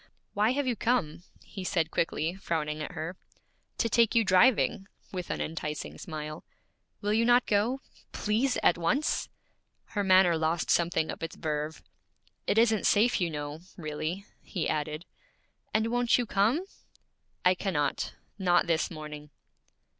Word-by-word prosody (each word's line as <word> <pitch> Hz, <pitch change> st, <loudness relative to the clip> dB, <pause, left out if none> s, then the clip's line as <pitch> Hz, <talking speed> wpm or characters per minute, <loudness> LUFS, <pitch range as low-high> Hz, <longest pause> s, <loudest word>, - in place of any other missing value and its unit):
'Why 215 Hz, +4 st, +2 dB
have 285 Hz, +1 st, 0 dB
you 250 Hz, -2 st, 0 dB
come?' 215 Hz, -11 st, 0 dB, 0.2 s
he 190 Hz, -, -8 dB
said 165 Hz, -3 st, 0 dB
quickly, 165 Hz, 0 st, 0 dB
frowning 155 Hz, -5 st, -2 dB
at -, -, -5 dB
her. 170 Hz, +4 st, -5 dB, 0.6 s
'To 230 Hz, -, +1 dB
take 230 Hz, +1 st, +3 dB
you 230 Hz, -, +5 dB
driving,' 195 Hz, 0 st, +4 dB, 0.2 s
with 180 Hz, -2 st, -5 dB
an -, -, -2 dB
enticing 150 Hz, -1 st, -4 dB
smile. 155 Hz, -2 st, -6 dB, 0.6 s
'Will 205 Hz, 0 st, 0 dB
you 225 Hz, +2 st, +3 dB
not 245 Hz, +1 st, +5 dB
go? 225 Hz, +6 st, +1 dB, 0.3 s
Please, 235 Hz, +5 st, 0 dB
at 175 Hz, -, +4 dB
once?' 255 Hz, -, 0 dB, 0.6 s
Her 205 Hz, -2 st, 0 dB
manner 185 Hz, -3 st, +5 dB
lost 160 Hz, +1 st, 0 dB
something 170 Hz, -2 st, +2 dB
of -, -, -8 dB
its 165 Hz, -, -5 dB
verve. 155 Hz, 0 st, -3 dB, 0.6 s
'It -, -, +1 dB
isn't 225 Hz, -2 st, +4 dB
safe, 220 Hz, +1 st, +3 dB
you 175 Hz, -, +1 dB
know, 150 Hz, 0 st, -5 dB, 0.2 s
really,' 155 Hz, +4 st, -4 dB, 0.2 s
he 175 Hz, -5 st, -3 dB
added. 155 Hz, +2 st, -2 dB, 0.7 s
'And 220 Hz, 0 st, +2 dB
won't 245 Hz, -1 st, +3 dB
you 245 Hz, -, 0 dB
come?' 225 Hz, -, +2 dB, 0.8 s
'I 180 Hz, -, +7 dB
cannot; 180 Hz, -6 st, -1 dB, 0.2 s
not 180 Hz, -2 st, +3 dB
this 165 Hz, -2 st, +1 dB
morning.' 150 Hz, -2 st, -8 dB
180 Hz, 145 wpm, -29 LUFS, 155-220 Hz, 0.8 s, I